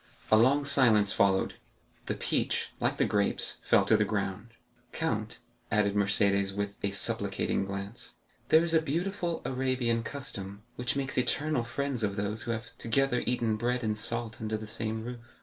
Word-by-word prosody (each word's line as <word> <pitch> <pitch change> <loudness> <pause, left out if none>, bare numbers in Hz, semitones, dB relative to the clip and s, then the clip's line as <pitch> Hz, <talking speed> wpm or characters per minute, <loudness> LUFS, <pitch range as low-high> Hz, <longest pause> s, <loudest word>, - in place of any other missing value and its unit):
A - - +8
long 135 +6 +4
silence 115 -8 +5
followed; 95 -1 +2 0.5
the - - -1
peach, - - -1
like - - 0
the - - +3
grapes, 100 -1 0
fell - - +4
to - - +4
the - - +3
ground. 105 +1 -3 0.4
"Count," 110 -9 -2 0.3
added 105 -1 +2
Mercédès 100 -1 +2
with 100 0 -2
a 100 - 0
supplicating 100 0 -1
glance, 100 +3 -6 0.4
"there 160 +1 +6
is 170 -1 0
a 160 - +5
beautiful 170 +3 -2
Arabian 130 -3 0
custom, 105 -7 -7
which 125 0 -1
makes 135 -2 -1
eternal 145 0 +1
friends 130 +1 -3
of 100 -2 0
those 105 +2 -2
who - - -6
have 115 0 -5
together 125 +1 +1
eaten 115 -3 +1
bread 125 +2 -1
and 110 -1 0
salt 115 +1 -1
under 110 0 -2
the 110 - -7
same 110 +1 -2
roof." 120 +1 -6
115 Hz, 165 wpm, -29 LUFS, 105-130 Hz, 0.5 s, A